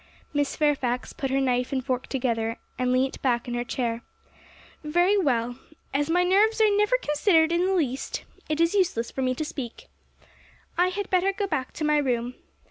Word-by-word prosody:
Miss 290 -1 0
Fairfax 265 -5 0
put 270 - -3
her 270 +1 +1
knife 250 -2 0
and 260 -2 -2
fork 255 -2 -2
together, 230 -3 -1 0.2
and 250 0 +1
leant 260 +1 0
back 240 -3 0
in 240 - -3
her 240 0 -1
chair. 235 -2 -2 0.8
'Very 350 +6 +3
well; 245 - 0 0.3
as 290 +2 0
my 355 +2 +3
nerves 410 +5 +3
are 430 -2 +4
never 420 +5 +3
considered 320 -2 +3
in 345 +2 +2
the 385 - +1
least, 270 -7 -2 0.3
it 310 0 -1
is 335 +2 +3
useless 360 - +1
for 265 - -4
me 255 0 +1
to 310 - -3
speak; 285 - -7 0.9
I 355 +1 +3
had 395 +2 -4
better 370 +1 +3
go 400 +1 -2
back 300 -9 -2
to 310 - -5
my 300 0 +3
room. 245 -3 -1
285 Hz, 190 wpm, -26 LUFS, 250-360 Hz, 0.9 s, are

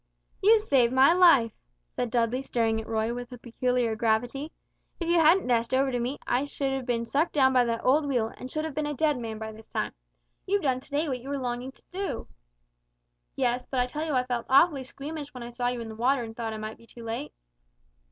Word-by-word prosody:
"You've 430 +2 +5
saved 255 - +3
my 265 +5 +6
life," 335 -11 +6 0.4
said 245 - -1
Dudley, 240 +2 +1
staring 225 -4 0
at 220 - -11
Roy 220 +1 -1
with 245 +1 -7
a 250 - -8
peculiar 245 -1 -1
gravity; 240 +7 0 0.5
"if 340 - -3
you 340 0 +4
hadn't 330 +4 +5
dashed 235 0 +1
over 270 0 +2
to 245 - -1
me, 250 +4 -2
I 250 - +1
should 280 -1 -2
have 265 -1 -4
been 235 -1 0
sucked 295 +8 0
down 265 -3 +4
by 250 -1 +4
that 230 -1 -2
old 285 +3 +3
wheel, 240 -5 0
and 255 - -8
should 310 +3 -2
have 315 - -5
been 300 +1 -2
a 295 - -3
dead 300 -1 +1
man 225 -2 -5
by 220 0 -6
this 220 0 -14
time. - - -3 0.5
You've 400 +1 +1
done 260 -3 +1
to - - -17
day 295 +3 0
what 260 -3 -2
you 265 - -9
were 285 - -1
longing 250 0 -3
to - - -20
do." 390 +2 -4 1.1
"Yes, 250 -1 0
but 260 - -1
I 245 - +3
tell 295 +5 -4
you 315 -2 -2
I 255 -1 +2
felt 245 -2 -3
awfully 280 +1 +5
squeamish 285 +2 -7
when 250 - -6
I 240 - -7
saw 245 +1 -2
you 245 -1 -2
in 230 - -6
the - - -7
water 250 +3 +1
and 225 -1 -8
thought 225 -1 -3
I - - -5
might 215 0 -6
be 230 - -18
too 235 - -12
late." 225 -9 -4
250 Hz, 240 wpm, -27 LUFS, 235-285 Hz, 1.1 s, my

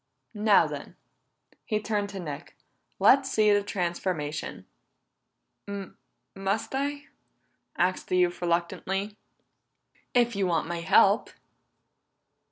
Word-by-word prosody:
Now 210 -1 +4
then," - - -7 0.7
he 215 -2 -1
turned 210 -1 -2
to 195 -1 -6
Nick, 150 -5 -7 0.4
"Let's 275 0 +5
see 215 -1 +4
this 205 0 +2
transformation." 170 -5 -3 1.0
"Must 200 +1 -5
I?" 285 +2 -2 0.7
asked 185 +1 0
the 185 - +1
youth 180 -1 +1
reluctantly. 180 +4 -1 1.0
"If 240 -2 +3
you 195 -1 +1
want 170 -2 +1
my 170 0 -4
help." 170 - +4
195 Hz, 100 wpm, -27 LUFS, 175-215 Hz, 1.0 s, Let's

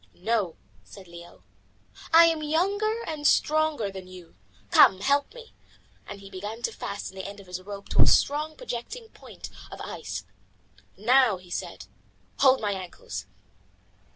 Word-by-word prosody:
"No," 200 -3 -1 0.3
said 195 -3 -14
Leo, 170 - -13 0.7
"I 335 +1 +9
am 325 -2 +2
younger 400 +9 0
and 300 -5 -1
stronger 310 -9 +2
than 190 -1 -9
you. 180 -2 -13 0.4
Come, 190 0 +7
help 280 +5 +2
me," 470 -2 -12 0.5
and 200 - -8
he 195 - -11
began 205 +5 -6
to - - 0
fasten 195 - -6
the 190 0 -6
end 200 0 -9
of 200 - -13
his 180 0 -6
rope 200 +1 -8
to - - +3
a - - +7
strong, 305 +2 +2
projecting 450 - -6
point - - -11 0.2
of - - -9
ice. - - -6 0.7
"Now," 240 0 +4
he 180 -1 -16
said, - - -5 0.5
"hold 265 -1 +6
my 205 -2 -1
ankles." 175 - -6
220 Hz, 155 wpm, -27 LUFS, 190-310 Hz, 0.7 s, I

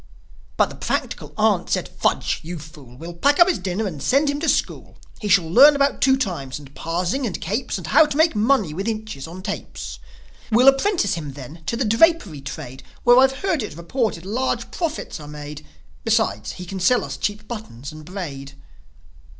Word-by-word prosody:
But - - +3
the - - -9
practical - - -3
aunt - - +2
said, - - 0
"Fudge! - - 0
You 170 +2 -6
fool! 145 -5 -13
We'll 170 +4 -8
pack 280 +12 +2
up 345 - +8
his 370 - +1
dinner 185 +4 -2
and 160 -8 -5
send 280 - +3
him 285 - -3
to 320 0 0
school. 280 - -1 0.2
He 210 - -4
shall 185 -4 +4
learn 275 - +7
about 280 0 +1
two 265 0 +5
times 165 - -3
and 140 -2 -13
parsing 180 - -2
and - - -4
capes, - - -2
And - - -7
how 315 - +5
to 295 - -3
make 320 -4 +4
money 215 - +2
with 195 +6 -4
inches 215 -10 -4
on 180 +3 -9
tapes. - - -6 0.5
We'll 245 +4 +5
apprentice 275 - +1
him 150 -5 -5
then 145 +4 -10
to 230 - -1
the 255 - 0
drapery 225 - +3
trade, 135 -2 -8 0.2
Where, 245 +1 +7
I've 265 +3 +3
heard 365 -7 +1
it 205 -8 -6
reported, 185 0 -2
large 245 +7 -2
profits 325 - -3
are 150 - -10
made; 150 0 -8 0.4
Besides, 100 +7 0
he 180 - -8
can 190 +2 -6
sell 245 +7 +3
us - - -5
cheap 210 +1 -3
buttons 160 - -7
and 155 0 -11
braid." 150 -6 -7
195 Hz, 195 wpm, -22 LUFS, -, 0.5 s, up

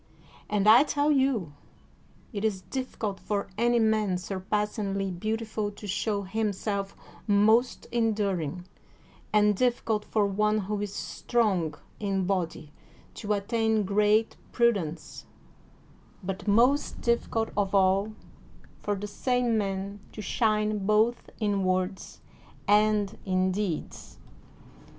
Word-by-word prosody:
And 205 -1 +1
I 225 +4 +9
tell 290 0 +1
you 260 - +1 0.8
it 200 -1 -3
is 205 -4 0
difficult 230 -6 -4
for 205 -2 -2
any 240 +3 +2
man 215 -4 +2
surpassingly 195 +1 -2
beautiful 215 +3 -2
to 210 - -11
show 205 +1 -1
him 210 +2 -1
self 200 0 -3 0.3
most 220 +4 +3
enduring, 200 -8 -1 0.7
and 210 -1 +4
difficult 230 -2 0
for 215 -2 +1
one 210 +2 +1
who 205 +1 -3
is 205 -1 -3
strong 195 -10 -1 0.2
in 195 -2 -1
body 170 -5 -2 0.4
to 210 -1 -2
attain 220 +1 +1
great 210 +3 +2
prudence, 200 -10 -1 1.0
but 195 +3 -5
most 245 +8 +3
difficult 235 -1 0
of 200 -1 0
all 195 +2 +3 0.7
for 205 - -1
the 200 +1 -5
same 245 +2 0
man 200 -1 -2
to 215 - -6
shine 215 -3 +1
both 220 +3 +2
in 205 -3 0
words 185 +1 -2 0.5
and 210 0 +3
in 185 -1 +1
deeds. 185 -4 -4
210 Hz, 115 wpm, -28 LUFS, 195-220 Hz, 1.0 s, I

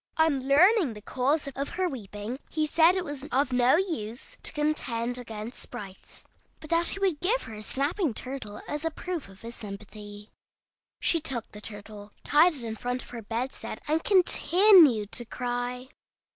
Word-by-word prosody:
On 290 -5 +2
learning 340 - +5
the 210 - -9
cause 280 +6 0
of 275 +1 -3
her 370 0 -1
weeping, 220 - -6
he 310 -1 0
said 325 +3 +4
it 370 -1 -1
was 290 -2 -6
of 265 0 +1
no 250 +2 +5
use 285 - -3
to - - -1
contend 250 -6 -1
against 225 0 -7
sprites, 200 -6 -10 0.3
but 310 - -11
that 335 0 +3
he - - +2
would 375 -6 +1
give 455 +8 +1
her 225 - -9
his 215 0 -6
snapping 295 +4 0
turtle 250 -6 -6
as 295 +1 -4
a 325 - +1
proof, 325 - -5
of 195 0 -16
his 230 +1 -7
sympathy. 205 0 -9 0.7
She 335 - +3
took 265 -7 -3
the 210 - -9
turtle, 205 -1 -8
tied 315 +3 +5
it 260 - -3
in 225 -1 -4
front 245 +3 -3
of - - -14
her 235 -2 -6
bedstead, 235 +5 -4
and 315 +2 +1
continued 355 - +5
to 240 - 0
cry. 245 +1 -4
260 Hz, 175 wpm, -28 LUFS, 225-320 Hz, 0.7 s, learning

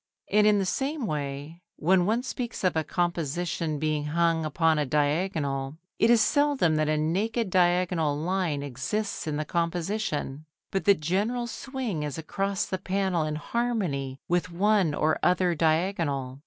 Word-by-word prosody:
And 210 0 +5
in 210 -1 +5
the 195 - +1
same 275 +7 -1
way, 150 0 -4
when 180 +2 +3
one 230 +4 +1
speaks 245 -4 -5
of 185 -2 +2
a 160 - +1
composition 170 -1 -1
being 155 0 -1
hung 165 +1 +1
upon 160 +1 +2
a 150 - +1
diagonal, 145 -1 0 0.2
it 225 - +4
is 235 -2 +6
seldom 280 - +2
that 155 0 +1
a 155 - +2
naked 195 +7 0
diagonal 175 -4 +2
line 165 -3 -1
exists 145 - -3
in 150 -1 -1
the 155 - -2
composition, 170 -3 -2 0.3
but 195 - -1
the 200 - +6
general 200 +10 -1
swing 240 - -4
is 145 -2 -4
across 195 +4 -2
the 185 - -3
panel 190 -3 0
in 155 0 -2
harmony 155 - -2
with 175 +1 0
one 190 -3 +2
or 155 +1 +1
other 180 0 +3
diagonal. 155 -5 0
170 Hz, 155 wpm, -27 LUFS, 150-200 Hz, 0.3 s, is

